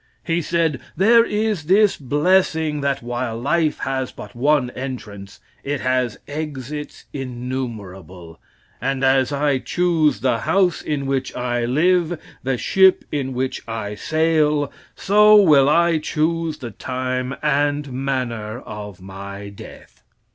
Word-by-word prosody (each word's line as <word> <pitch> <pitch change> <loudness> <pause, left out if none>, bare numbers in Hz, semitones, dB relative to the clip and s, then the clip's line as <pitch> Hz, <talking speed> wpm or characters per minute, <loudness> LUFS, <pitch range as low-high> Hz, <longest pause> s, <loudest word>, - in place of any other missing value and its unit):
He 165 +1 0
said, 165 -4 0 0.2
"There 230 +5 +6
is 210 -7 -1
this 200 +4 +4
blessing, 155 +1 +1
that 140 -3 -1
while 120 -1 -3
life 155 +4 +1
has 130 -1 -2
but 105 - -11
one 135 0 +2
entrance, 105 -7 -7 0.2
it 145 -1 -2
has 130 -2 0
exits 150 -1 -6
innumerable, 110 - -6 0.4
and 135 0 -1
as 130 0 +3
I 140 -1 +1
choose 160 - +1
the 125 -3 +1
house 185 - +1
in 145 -2 -3
which 135 -1 -2
I 120 -1 -1
live, 170 +5 +2 0.2
the 130 -1 -1
ship 190 +7 +4
in 135 -3 -2
which 130 +1 -2
I 110 -2 -4
will 105 - -6
sail, 155 -2 +1 0.2
so 210 +2 +5
will 150 -9 +6
I 170 +1 +3
choose 160 +1 -1
the 125 -6 -7
time 130 +2 -3
and 145 -1 0
manner 125 -4 -3
of 105 -3 -9
my 100 +1 -8
death." 100 - -13
135 Hz, 135 wpm, -21 LUFS, 125-160 Hz, 0.4 s, There